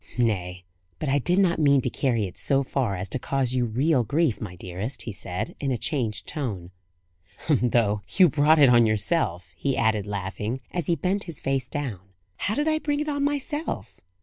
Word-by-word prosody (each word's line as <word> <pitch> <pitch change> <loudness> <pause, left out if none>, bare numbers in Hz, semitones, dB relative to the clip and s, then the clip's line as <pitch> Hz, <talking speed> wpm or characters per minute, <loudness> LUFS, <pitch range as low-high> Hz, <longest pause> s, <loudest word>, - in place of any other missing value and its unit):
"Nay, 90 -6 -1 0.3
but 150 - -3
I 140 +1 +3
did 175 +7 +1
not 185 -4 +3
mean 140 -2 +5
to 125 - -1
carry 120 -6 0
it 90 - -8
so 140 0 +1
far 125 -6 -1
as 95 +1 -4
to 130 - -1
cause 130 -1 -1
you 125 -1 +1
real 130 +4 +2
grief, 145 0 +1
my 95 -5 -6
dearest," 95 +8 -5
he 115 - -5
said, 100 +3 -4
in 140 - -2
a 125 - 0
changed 120 -7 -2
tone. 105 - -4 0.8
"Though 120 -7 +2
you 185 -2 +6
brought 155 +1 +4
it 140 -4 +7
on 120 -2 +6
yourself," 100 - 0
he 135 +9 -1
added, 110 -2 +1
laughing, 105 +5 -3
as 175 -2 -2
he 170 - +3
bent 185 +6 -1
his 170 -5 -5
face 135 -2 -1
down. 130 -8 -4 0.4
"How 210 - -1
did 295 +1 0
I 310 0 +2
bring 290 -1 -1
it 300 0 -2
on 285 -1 -1
myself?" 290 +2 -3
130 Hz, 200 wpm, -25 LUFS, 105-160 Hz, 0.8 s, it